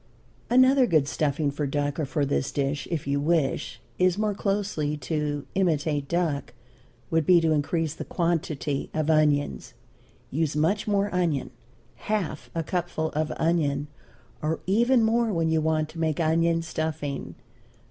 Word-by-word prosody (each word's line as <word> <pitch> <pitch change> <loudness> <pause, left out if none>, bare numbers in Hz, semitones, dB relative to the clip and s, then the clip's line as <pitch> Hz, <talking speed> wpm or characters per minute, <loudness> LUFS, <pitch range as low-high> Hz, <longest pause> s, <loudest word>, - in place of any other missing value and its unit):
Another 255 +1 +5
good 155 -8 +3
stuffing 145 0 0
for 145 0 -2
duck 145 +2 -1
or 155 - 0
for 145 +1 0
this 140 -1 -1
dish, 140 0 -2
if 165 -4 -2
you 140 +1 0
wish 150 -2 0 0.2
it 185 0 +3
more 210 -1 0
closely 195 -7 -1
to 150 -1 -2
imitate 155 -6 0
duck, 160 -7 -1 0.6
would 165 -1 +3
be 175 +3 +6
to 165 -1 +1
increase 155 +1 0
the - - -6
quantity 155 -5 -1
of 155 0 +1
onion 145 - +2 0.7
use 155 +1 0
much 165 +9 +1
more 205 -1 +1
onion, 165 -9 0 0.6
half 210 -6 -2
a 165 - 0
cupful 170 -2 -2
of 155 +1 -2
onion, 150 -4 0 0.5
or 155 +1 -1
even 235 +5 +3
more 230 0 +2
when 165 -3 +1
you 160 -1 +2
want 155 0 +1
to 165 - -9
make 160 -1 0
onion 165 +1 +2
stuffing. 155 -3 -4
160 Hz, 150 wpm, -26 LUFS, 145-175 Hz, 0.7 s, be